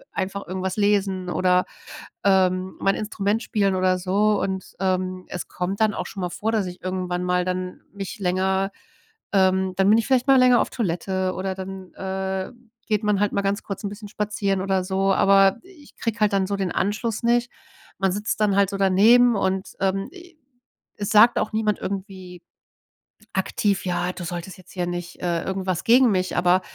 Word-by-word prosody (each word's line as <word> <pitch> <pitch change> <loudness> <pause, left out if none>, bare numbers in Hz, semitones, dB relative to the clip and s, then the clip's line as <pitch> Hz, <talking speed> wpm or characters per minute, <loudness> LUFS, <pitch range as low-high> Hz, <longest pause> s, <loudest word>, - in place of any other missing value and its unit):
einfach 195 +1 -4
irgendwas 185 +1 -3
lesen 195 -3 +1
oder, 180 0 +2 0.6
ähm, 185 -1 +2
mein 195 0 +2
Instrument 210 0 -1
spielen 200 -3 +1
oder 185 0 +2
so. 200 +3 +1
Und, 190 -1 -4
ähm, 185 -1 -1
es 180 - -5
kommt 185 +2 -4
dann 215 -2 +3
auch - - -4
schon - - -9
mal 180 -1 -2
vor, 215 +5 -2
dass 215 -3 0
ich 180 0 -9
irgendwann 180 -1 -2
mal 180 0 +1
dann 185 0 -3
mich 200 +3 -6
länger, 190 +1 0 0.6
ähm 190 -1 +2
dann 195 0 +3
bin 215 - +6
ich - - -1
vielleicht 260 -1 +2
mal 270 -1 +6
länger 250 -1 +6
auf - - -2
Toilette, 185 -3 -1
oder 190 0 -3
dann, 190 -1 -8
äh, 190 0 -3 0.4
geht 210 -2 +1
man 210 -2 +1
halt 205 - +2
mal 200 - +1
ganz 200 +2 -1
kurz 195 - -6
'n 205 - -1
bisschen 205 +1 -9
spazieren 205 -2 -1
oder 190 -1 0
so. 195 +1 +1
Aber 195 0 +5
ich 365 -6 -18
kriege 230 -2 -3
halt 210 -1 +3
dann 195 -1 +1
so 200 0 -2
den 190 -2 -2
Anschluss 215 +3 -1
nicht. 240 +1 +2 0.5
Man 195 -1 +2
sitzt 210 +2 -2
dann 205 -2 +3
halt 200 -1 +4
so - - -3
daneben 220 +6 +5
und, 190 0 -1
ähm, 195 0 0
e 355 -2 -14 0.6
es 205 -1 -3
sagt 225 +3 +6
auch - - -2
niemand 215 -1 0
irgendwie 190 -2 -6 0.9
aktiv: 195 +1 0
„Ja, 175 0 -1
du 185 - -8
solltest 175 +2 -6
jetzt 185 -1 -17
hier 180 -2 -2
nicht 175 0 -6
"Äh, 170 -2 0
irgendwas 190 -2 -2
gegen 245 +1 +5
mich. 185 -1 -1
Aber 180 +1 +3
195 Hz, 190 wpm, -23 LUFS, 185-205 Hz, 0.9 s, bin